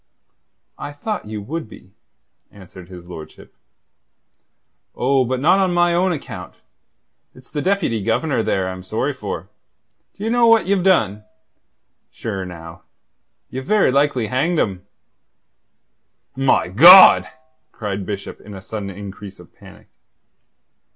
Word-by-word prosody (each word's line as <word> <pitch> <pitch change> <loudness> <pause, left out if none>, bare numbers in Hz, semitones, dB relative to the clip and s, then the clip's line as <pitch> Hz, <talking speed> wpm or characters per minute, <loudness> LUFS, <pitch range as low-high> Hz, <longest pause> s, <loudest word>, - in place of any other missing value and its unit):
I 145 - -7
thought 205 - -5
you 105 -1 -6
would 155 +1 -6
be, 95 -3 -16 0.6
answered 95 -2 -14
his 90 -2 -12
lordship. 80 -3 -12 1.4
"Oh, 130 +1 +1
but 130 +1 -2
not 175 +8 +3
on 185 -2 +1
my 175 0 +3
own 180 +2 +1
account. 95 - -7 0.8
It's 130 0 -17
the 150 - -3
Deputy 185 - 0
Governor 115 +5 0
there 95 -3 -1
I'm 95 0 -6
sorry 90 - -3
for. - - -7 0.7
D'ye 210 - -5
know 240 0 +3
what 230 -1 +4
Ye've 195 -1 +1
done? 110 - +1 0.9
Sure, 100 -4 -6
now, 85 0 -11 0.7
ye've 130 +1 -6
very 210 -10 +3
likely 140 -3 +1
hanged 140 +9 -1
him." 95 -6 -2 1.5
"My 135 -6 +1
God!" 170 - +8 0.4
cried 100 -2 -5
Bishop 100 0 -7
in 105 -1 -11
a 95 - -9
sudden 105 -2 -6
increase 100 0 -10
of - - -17
panic. - - -17
115 Hz, 130 wpm, -19 LUFS, -, 1.5 s, God